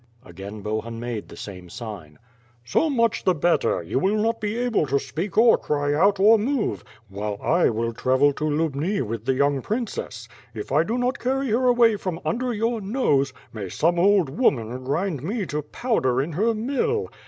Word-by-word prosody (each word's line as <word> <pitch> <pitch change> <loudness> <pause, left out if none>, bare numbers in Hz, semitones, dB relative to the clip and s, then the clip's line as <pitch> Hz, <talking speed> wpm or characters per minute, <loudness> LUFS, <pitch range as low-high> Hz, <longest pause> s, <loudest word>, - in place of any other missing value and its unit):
Again 100 +4 -9
Bohun 110 +2 -3
made 120 -3 -5
the - - -11
same 90 -3 -9
sign. 95 -10 -8 0.5
"So 310 - +1
much 230 -5 +1
the 185 - +3
better; 165 - +1
yon 125 +11 -1
will 200 +5 +2
not 225 +2 0
hv. 220 +4 -1
able 225 -11 +1
to 140 +1 +2
speak 160 +9 -4
or 230 +1 +6
cry 145 -1 -1
out, 195 +6 +3
or 215 +3 +6
move; 250 +1 -1 0.2
while 100 +1 -4
I 170 +2 +2
will 115 +1 -2
travel 130 +4 +2
to 150 - -6
Lubni 155 +4 0
with 115 -1 -5
the 130 0 +1
young 140 0 +1
princess. 205 - -4 0.3
If 105 +2 -6
I 145 +3 +4
do 225 +7 -2
not 250 +1 -1
carry 265 +1 -1
her 245 +4 +2
away 235 -3 +4
from 185 -4 -4
under 250 +2 -1
your 230 +1 -1
nose. 190 - +1 0.2
may 100 -4 -5
some 170 - +1
old 190 -4 +4
woman 130 - 0
grind 155 +1 -1
nie 200 - -2
to 150 -2 -3
])owder 145 - 0
in 160 - -5
her 220 +8 +1
mill! 280 - -1
165 Hz, 190 wpm, -24 LUFS, -, 0.5 s, or